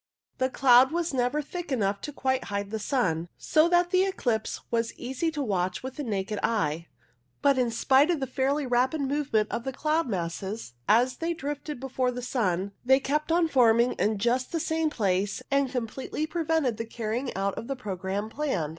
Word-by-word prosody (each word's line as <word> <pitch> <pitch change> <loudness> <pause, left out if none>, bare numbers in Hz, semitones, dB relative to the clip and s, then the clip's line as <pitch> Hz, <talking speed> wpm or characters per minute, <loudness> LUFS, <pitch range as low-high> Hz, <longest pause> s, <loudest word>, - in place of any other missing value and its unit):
The 260 0 +2
cloud 260 0 +5
was 340 -2 -1
never 260 +4 0
thick 350 +1 -6
enough 200 -5 0
to 295 - -5
quite 260 -2 -1
hide 200 0 -3
the 220 - -2
sun, 175 - 0
so 310 +2 +3
that 350 0 +3
the 370 0 +4
eclipse 245 - -1
was 230 -1 0
easy 265 +6 -2
to 300 -3 -3
watch 185 -4 -1
with 260 +2 -6
the 295 - -3
naked 205 -3 -2
eye; 165 -7 0 0.6
but 280 -2 +4
in 245 -2 +2
spite 265 +6 +3
of 290 -6 0
fairly 275 +3 0
rapid 255 +5 +1
movement 270 -6 0
of 235 - -2
the 265 - -3
cloud 305 +3 0
masses 190 - -4 0.2
as 245 +3 +4
they 335 +1 -2
drifted 290 -2 -5
before 260 -1 -1
the 250 0 -5
sun, 200 -6 -1
they 265 +2 +5
kept 300 +4 -1
on 335 0 +3
forming 240 -4 +4
in 215 0 +1
just 240 +5 0
the 335 - -1
same 320 0 0
place, 200 -6 -1
and 275 -2 +2
com 250 -3 -1
pletely 270 +6 -4
prevented 320 -8 0
the 230 - -3
carrying 235 +3 -3
out 195 +1 0
of 230 - -7
the 275 - -2
programme 200 -3 -3
planned. 220 - -2
255 Hz, 190 wpm, -27 LUFS, 215-290 Hz, 0.6 s, cloud